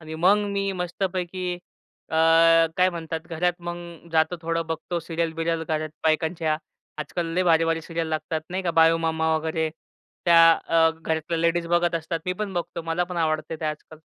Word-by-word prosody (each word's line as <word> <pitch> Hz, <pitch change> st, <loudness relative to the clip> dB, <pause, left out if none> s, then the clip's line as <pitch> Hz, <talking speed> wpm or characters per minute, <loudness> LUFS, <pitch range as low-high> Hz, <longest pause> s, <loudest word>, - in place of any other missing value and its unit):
आणि 160 Hz, 0 st, -8 dB
मग 185 Hz, +6 st, +4 dB
मी 200 Hz, 0 st, -1 dB
मस्तपैकी 180 Hz, 0 st, -3 dB, 0.6 s
अ, 160 Hz, -, -1 dB, 0.6 s
काय 185 Hz, 0 st, +4 dB
म्हणतात 165 Hz, -1 st, -5 dB
घरात 175 Hz, +2 st, +1 dB
मग 175 Hz, 0 st, -3 dB, 0.4 s
जातो, 160 Hz, +2 st, +2 dB
थोडं 165 Hz, 0 st, -1 dB
बघतो 165 Hz, +2 st, -3 dB
सीरियल 165 Hz, 0 st, -2 dB
बिरियल 165 Hz, 0 st, -1 dB
घरात 155 Hz, 0 st, -1 dB, 0.2 s
बायकांच्या. 160 Hz, 0 st, +1 dB, 0.4 s
आजकाल 165 Hz, +2 st, -3 dB
लय 185 Hz, -, +2 dB
भारी-भारी 165 Hz, -1 st, +3 dB
सीरियल 165 Hz, 0 st, -3 dB
लागतात 155 Hz, 0 st, -2 dB
नाही 185 Hz, +1 st, -2 dB
का 175 Hz, -, 0 dB
बाळू 165 Hz, 0 st, +5 dB
मामा 160 Hz, -1 st, 0 dB
वगैरे, 160 Hz, 0 st, -1 dB, 0.6 s
त्या 170 Hz, -1 st, +6 dB, 0.3 s
अ, 165 Hz, -1 st, +4 dB
घरातल्या 160 Hz, 0 st, -3 dB
लेडीज 170 Hz, +1 st, +1 dB
बघत 175 Hz, 0 st, +2 dB
असतात. 165 Hz, 0 st, -2 dB
मी 180 Hz, -, +1 dB
पण 200 Hz, +1 st, -4 dB
बघतो 170 Hz, -1 st, -4 dB
मला 165 Hz, +2 st, -1 dB
पण 180 Hz, 0 st, -7 dB
आवडते 155 Hz, 0 st, -1 dB
ते -, -, -3 dB
आजकाल. 155 Hz, 0 st, -5 dB
165 Hz, 170 wpm, -24 LUFS, 160-175 Hz, 0.6 s, त्या